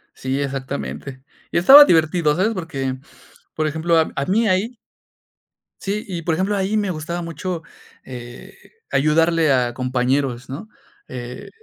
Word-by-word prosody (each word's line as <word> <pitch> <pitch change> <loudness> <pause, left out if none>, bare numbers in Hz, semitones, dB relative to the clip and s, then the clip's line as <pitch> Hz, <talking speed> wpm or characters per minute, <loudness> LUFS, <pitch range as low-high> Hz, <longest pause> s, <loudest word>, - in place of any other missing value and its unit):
Sí, 130 +1 -3
exactamente. 130 - -5 0.3
Y - - 0
estaba 275 +12 +10
divertido, 160 - +2
¿sabes? 200 +6 +1
Porque, 140 -8 -4 0.6
por 155 0 -1
ejemplo, 160 +2 +1
a 155 -3 0
mí 220 +4 +2
ahí. 205 +6 0 1.1
Sí, 205 +2 -3
y, 175 -4 -5
por 165 - 0
ejemplo, 195 +4 0
ahí 195 +2 -1
me 205 -3 0
gustaba 170 +2 -4
mucho, 170 +1 -5 0.4
eh, 120 -1 -10 0.4
ayudarle 160 +1 +3
a 125 -2 +1
compañeros, 125 0 -1
¿no? 145 +11 -7 0.4
Eh, 125 0 -8
160 Hz, 135 wpm, -21 LUFS, 130-185 Hz, 1.1 s, estaba